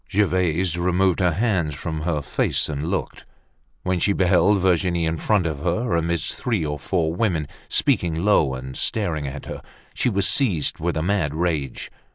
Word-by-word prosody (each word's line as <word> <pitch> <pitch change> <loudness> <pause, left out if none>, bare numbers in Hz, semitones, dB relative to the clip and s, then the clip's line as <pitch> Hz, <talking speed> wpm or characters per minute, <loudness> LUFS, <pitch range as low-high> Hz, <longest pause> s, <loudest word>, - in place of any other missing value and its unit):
Gervaise 90 -4 +1
removed 90 +1 +2
her 90 -3 +2
hands 90 -7 0
from 80 +1 -4
her 75 -3 -1
face 60 - 0
and 75 +1 -3
looked. 95 -1 -3 0.6
When 90 -1 0
she 100 - +2
beheld 95 +1 +3
Virginie 90 -2 +1
in 80 0 -1
front 100 +1 +1
of 80 -4 -2
her, 90 - 0
amidst 85 0 -1
three 110 -10 -1
or 75 0 -3
four 85 -4 0
women, 85 -6 0 0.2
speaking 95 - +1
low 80 -10 +3
and 65 0 -7
staring 85 -10 -1
at 70 0 -7
her, - - -7 0.3
she - - +1
was 100 -3 +1
seized 105 - +1
with 85 0 -1
a 80 - 0
mad 85 -6 0
rage. 80 -6 -2
85 Hz, 175 wpm, -23 LUFS, 80-95 Hz, 0.6 s, beheld